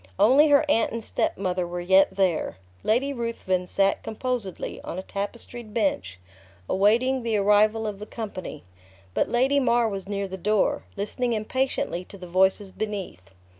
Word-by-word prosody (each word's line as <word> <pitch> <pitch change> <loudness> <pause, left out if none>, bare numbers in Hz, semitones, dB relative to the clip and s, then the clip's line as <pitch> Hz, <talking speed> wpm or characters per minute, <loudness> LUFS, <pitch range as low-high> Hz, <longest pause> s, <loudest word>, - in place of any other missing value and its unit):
Only 270 +8 +6
her 290 +1 +5
aunt 230 -6 +2
and 230 0 -3
step - - -1
mother 180 -2 -1
were 175 +1 -4
yet 190 +2 +4
there. 185 - 0 0.2
Lady 265 +6 +1
Ruthven 230 -7 -2
sat 195 +1 +2
composedly, 225 -4 -4
on - - -6
a 190 - -4
tapestried 215 +3 -6
bench, 95 - -1 0.5
awaiting 235 +7 +2
the 230 -2 0
arrival 210 +2 +3
of 205 -2 -4
the 210 - -8
company. 205 - -7 0.5
But - - +1
Lady 265 +4 +3
Mar 240 -3 +3
was 195 -2 -5
near 200 -1 -2
the 190 0 -6
door, 210 +2 +1
listening 235 +4 -1
impatiently 220 -4 -1
to 200 - -12
the 185 - -9
voices 190 +2 +2
beneath. 190 - -5
210 Hz, 160 wpm, -25 LUFS, 190-235 Hz, 0.5 s, Only